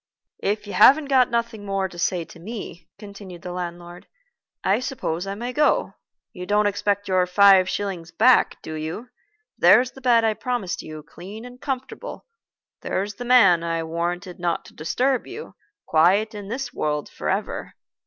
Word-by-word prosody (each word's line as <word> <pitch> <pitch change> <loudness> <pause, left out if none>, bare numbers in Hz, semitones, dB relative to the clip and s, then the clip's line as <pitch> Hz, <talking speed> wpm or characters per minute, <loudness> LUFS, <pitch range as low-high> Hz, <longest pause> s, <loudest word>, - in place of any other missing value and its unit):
"If 210 +1 -1
you 205 - -7
haven't 280 +7 +6
got 260 -2 +4
nothing 235 -2 -2
more 195 -1 -1
to 175 -2 -12
say 175 -1 0
to 165 - -15
me," 180 -3 -8
continued 200 -4 -11
the 180 - -6
landlord, 175 0 -7 0.6
"I 200 +4 +2
suppose 195 - -3
I 195 - -3
may 240 +4 -5
go. 305 - +2 0.4
You 180 -1 -8
don't 210 0 +2
expect 205 0 0
your 185 -1 +2
five 190 0 +6
shillings 190 -5 -4
back, 230 +10 +4
do 160 - -6
you? 160 +10 -5 0.5
There's 250 +1 +6
the 265 - -14
bed 240 -3 +4
I 220 - +2
promised 225 -4 -3
you, 155 -1 -9
clean 195 +9 -10
and 250 0 -12
comfortable. 265 -2 -5 0.6
There's 200 +2 -2
the 245 - -8
man 210 -9 +6
I 165 -1 -1
warranted 175 +3 -4
not 175 -1 -1
to - - -15
disturb 250 - -1
you, 460 - -9 0.3
quiet 190 +8 +3
in 205 -2 -8
this 260 +6 -4
world 150 -1 -2
forever. - - -3
200 Hz, 165 wpm, -23 LUFS, 175-235 Hz, 0.6 s, haven't